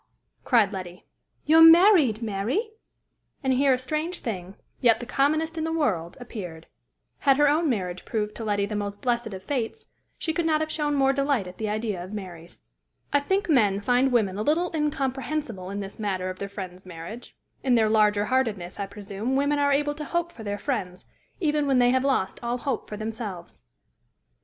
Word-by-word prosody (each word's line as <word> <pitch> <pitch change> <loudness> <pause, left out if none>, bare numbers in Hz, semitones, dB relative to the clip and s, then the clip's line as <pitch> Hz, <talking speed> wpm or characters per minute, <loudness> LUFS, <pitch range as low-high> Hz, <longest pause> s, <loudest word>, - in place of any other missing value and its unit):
cried 220 -5 +3
Letty; 180 -1 -7 0.4
"you're 320 +2 +6
married, 325 - +7
Mary?" 230 - -1 0.7
And 265 -1 +2
here 270 +2 +3
a - - +2
strange 305 +7 -3
thing, 190 -4 -5 0.2
yet 230 -3 +4
the 240 - -6
commonest 310 +6 +1
in - - -1
the 320 - -1
world, 190 - -1
appeared; 180 -9 -8 0.5
had 275 -2 +4
her 295 0 +5
own 310 +2 +2
marriage 185 -6 -2
proved 210 -2 -2
to 230 - -5
Letty 205 -2 0
the 210 +1 -5
most 205 0 -4
blessed 240 -2 0
of 190 -1 -8
fates, 275 - -4 0.3
she 320 - -2
could 330 0 0
not 310 -1 +3
have 315 0 -2
shown 295 -1 0
more 270 -1 +3
delight 275 -6 +1
at 180 0 -11
the 215 -1 -2
idea 210 -4 -2
of 185 +3 -9
Mary's. 175 -5 -9 0.5
I 285 - +5
think 385 +8 0
men 210 - +3
find 250 +5 +2
women 205 -5 +1
a - - 0
little 325 +9 +1
incomprehensible 270 -7 -2
in 200 +1 -4
this 195 +2 -8
matter 185 -3 -2
of 185 - -11
their 200 - -4
friends' 185 -2 -8
marriage: 180 +6 -9 0.3
in 255 -2 +3
their 220 -2 +4
largerheartedness, 210 -2 +1
I 200 - -2
presume, 205 +5 -4
women 285 +1 +2
are 285 0 +3
able 290 +1 +1
to 300 +1 -7
hope 345 +3 -2
for 245 - -12
their 205 -1 -3
friends, 200 -7 -3 0.3
even 300 -4 +1
when 270 -2 +3
they 245 0 +5
have 260 0 +2
lost 265 -9 0
all 240 +1 -1
hope 255 -1 -3
for 210 - -5
themselves. 215 -5 -6
235 Hz, 190 wpm, -26 LUFS, 200-285 Hz, 0.7 s, married